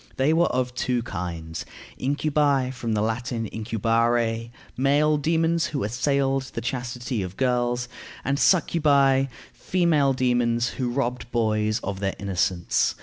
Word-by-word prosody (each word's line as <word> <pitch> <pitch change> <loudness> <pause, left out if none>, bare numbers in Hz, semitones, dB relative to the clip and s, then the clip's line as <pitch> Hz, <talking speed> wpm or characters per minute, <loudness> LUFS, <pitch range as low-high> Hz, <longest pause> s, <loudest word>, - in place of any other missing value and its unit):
They 135 +4 +3
were 170 +2 +3
of 125 0 -1
two 125 -1 -1
kinds: 85 -5 -5 0.4
incubi, 140 -1 +1
from 120 -3 -3
the 105 -1 +1
Latin 115 +1 -2
incubare, 115 +1 0 0.3
male 145 +3 +3
demons 165 +2 +1
who 140 -3 -3
assailed 135 +4 +1
the - - -1
chastity 125 -1 -3
of 90 0 -6
girls; 125 -1 0 0.4
and 140 +1 0
succubæ, 140 -7 +3 0.3
female 160 -7 +2
demons 120 -2 +1
who 125 -2 -3
robbed 125 -1 -2
boys 110 -2 +1
of 95 0 -4
their 95 -1 -1
innocence. 95 -3 0
125 Hz, 130 wpm, -25 LUFS, 115-140 Hz, 0.4 s, They